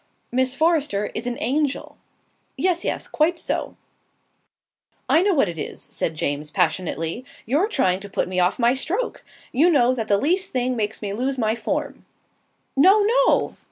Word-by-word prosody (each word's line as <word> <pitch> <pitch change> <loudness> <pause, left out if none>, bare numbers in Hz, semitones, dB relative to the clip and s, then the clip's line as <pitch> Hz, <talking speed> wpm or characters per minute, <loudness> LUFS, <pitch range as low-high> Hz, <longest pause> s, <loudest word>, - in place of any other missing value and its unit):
"Miss 255 +1 +1
Forrester 295 -10 +1
is 230 +3 -3
an 245 0 -3
angel." 290 0 -1 0.6
"Yes, 360 -2 +1
yes. - - -2
Quite 330 +3 +1
so." - - -3 1.3
"I 325 - +4
know 390 -1 +2
what 270 -8 +3
it 170 -2 -5
is," - - -6
said 160 - -2
James, 150 0 -2
passionately. 165 +6 -1 0.2
"You're 295 - +2
trying 190 - +1
to 200 +1 -9
put - - -1
me 185 0 -1
off 180 0 +2
my 240 0 +3
stroke. 375 - -3 0.3
You 310 +8 +4
know 255 -6 +4
that 225 -4 -3
the 200 - +3
least 355 - +1
thing 255 0 0
makes 220 -1 -3
me 200 -1 -3
lose 260 +5 -2
my 220 -3 +1
form." - - -3 0.7
"No, 380 +10 +6
no!" - - +2
255 Hz, 165 wpm, -23 LUFS, 205-320 Hz, 1.3 s, No